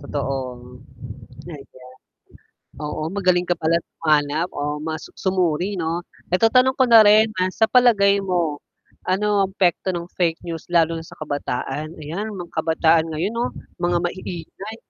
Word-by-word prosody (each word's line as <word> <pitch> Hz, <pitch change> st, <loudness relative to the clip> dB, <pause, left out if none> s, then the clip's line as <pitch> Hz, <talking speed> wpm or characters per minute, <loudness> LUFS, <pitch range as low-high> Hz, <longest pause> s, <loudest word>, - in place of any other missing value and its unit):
Totoong 135 Hz, -3 st, -4 dB, 0.9 s
ayan. 130 Hz, -4 st, -13 dB, 0.9 s
Oo, 150 Hz, +1 st, -4 dB
magaling 180 Hz, -2 st, +2 dB
ka 175 Hz, -, +3 dB
pala 165 Hz, +1 st, +3 dB, 0.3 s
humanap 155 Hz, +2 st, +2 dB
o 145 Hz, -, -4 dB, 0.2 s
mas 160 Hz, -1 st, -4 dB, 0.2 s
sumuri 180 Hz, -2 st, +1 dB
'no? 165 Hz, +1 st, -2 dB, 0.3 s
Eto 185 Hz, +5 st, +4 dB
tanong 255 Hz, +1 st, +4 dB
ko -, -, +6 dB
na 230 Hz, -2 st, +8 dB
rin 215 Hz, +1 st, +7 dB
na 185 Hz, 0 st, +1 dB
sa 220 Hz, -, +2 dB
palagay 205 Hz, -6 st, +5 dB
mo, 175 Hz, -6 st, -1 dB, 0.5 s
ano 195 Hz, +3 st, +1 dB, 0.2 s
ang 190 Hz, -, -9 dB
epekto 185 Hz, 0 st, +1 dB
ng 175 Hz, 0 st, -6 dB
fake 165 Hz, -2 st, +1 dB
news 165 Hz, -2 st, -6 dB
lalo 165 Hz, -1 st, +4 dB
na 160 Hz, -, -8 dB
sa -, -, -14 dB
kabataan, 145 Hz, +1 st, -4 dB
ayan 200 Hz, +8 st, -5 dB
mga 175 Hz, -2 st, -8 dB
kabataan 160 Hz, 0 st, +3 dB
ngayon 170 Hz, +8 st, -2 dB
'no 235 Hz, +1 st, -1 dB, 0.3 s
mga 175 Hz, 0 st, +2 dB
maiingay. 185 Hz, +3 st, -6 dB
170 Hz, 150 wpm, -22 LUFS, 155-190 Hz, 0.9 s, na